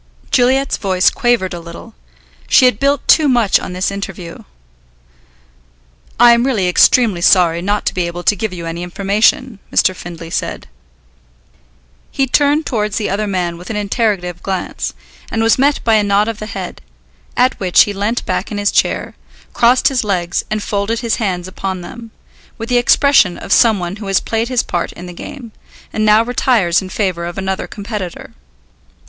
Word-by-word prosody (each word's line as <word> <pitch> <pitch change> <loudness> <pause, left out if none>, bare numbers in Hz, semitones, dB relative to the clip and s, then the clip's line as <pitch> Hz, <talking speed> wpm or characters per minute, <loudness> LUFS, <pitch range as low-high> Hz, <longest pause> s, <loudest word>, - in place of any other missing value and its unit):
Juliet's 265 +2 +2
voice 185 -2 +2
quavered 240 -7 0
a 175 - -5
little. 170 +7 -11 0.5
She 260 - +5
had 250 -4 +2
built 280 0 0
too 310 -2 +5
much 240 -6 +3
on - - -7
this 185 +2 -1
interview. 195 -3 -7 1.8
"I 240 0 +8
am 235 0 +3
really 230 -9 0
extremely 195 +1 +3
sorry 170 -2 +4
not 205 +3 -1
to - - 0
be 180 -2 -1
able 175 +1 -6
to 205 - +3
give 215 +1 -3
you 175 -2 -7
any 165 +1 -5
information," 200 +5 0
Mr. 185 - +2
Findlay 170 -2 -9
said. - - -3 1.5
He 270 - 0
turned 290 +3 +2
towards 210 -4 -2
the 215 -4 -2
other 210 +2 -1
man 175 -3 -2
with 180 - -11
an 220 - -3
interrogative 200 -4 -1
glance, 190 -2 -4 0.3
and 225 0 -1
was 225 +2 +3
met 285 +2 +2
by 225 - +2
a 210 - +2
nod 205 +1 +2
of 225 -2 -4
the 215 - -6
head, 195 -3 -7 0.6
at 250 +1 +2
which 185 -2 +5
he 205 - -4
leant 205 +4 -2
back 185 +3 -3
in 210 - -4
his 205 0 +1
chair, - - 0 0.4
crossed 245 +2 +3
his 260 -3 -1
legs 180 -4 -1
and 215 -1 -2
folded 210 +3 -2
his 235 -2 -1
hands 185 -5 -2
upon 185 0 -5
them, 230 +6 -10 0.5
with 225 +1 -6
the 245 -1 +3
expression 245 -7 +3
of - - -2
some 225 -3 +4
one 175 +2 -5
who 205 -2 -8
has 195 -1 +2
played 225 +1 -2
his 250 -2 +1
part 175 - -3
in 180 - -10
the 180 - -9
game, 235 +6 -9 0.4
and 215 - -1
now 215 +1 +5
retires 230 -7 +1
in 190 - -8
favour 185 -4 -2
of 175 - -7
another 190 0 -3
competitor. 205 -4 -7
205 Hz, 180 wpm, -16 LUFS, 180-235 Hz, 1.8 s, I